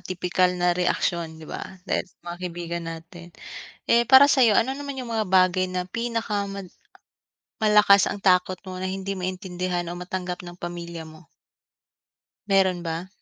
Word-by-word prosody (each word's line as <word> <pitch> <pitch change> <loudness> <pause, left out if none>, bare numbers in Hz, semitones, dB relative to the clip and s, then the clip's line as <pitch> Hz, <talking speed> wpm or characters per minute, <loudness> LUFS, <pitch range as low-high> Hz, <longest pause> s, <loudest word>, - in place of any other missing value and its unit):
tipikal 180 0 0
na 175 0 +2
reaksyon, 175 -2 -1
'di 160 - -11
ba, - - -6 0.2
dahil 185 -1 -1
sa - - -30
mga 175 0 -6
kaibigan 170 -1 -4
natin. 170 +1 -9 0.6
Eh 235 0 +5
para 275 +2 +8
sa'yo, 240 -6 +5
ano 260 +6 +2
naman 285 -1 -5
'yung 255 -3 -6
mga 220 -2 0
bagay 185 0 +3
na 180 0 -4
pinaka 230 -3 -2
mal 195 -2 -7 0.9
malakas 210 -2 +6
ang 205 - -4
takot 185 -1 +2
mo 185 - -6
na 185 - -4
hindi 195 +1 -3
maintindihan 180 -1 -3
o 175 - -5
matanggap 180 0 -5
ng 175 - -8
pamilya 170 -1 -6
mo? 155 -1 -14 1.2
Meron 190 -3 +2
ba? 165 +2 -4
185 Hz, 160 wpm, -24 LUFS, 175-200 Hz, 1.2 s, para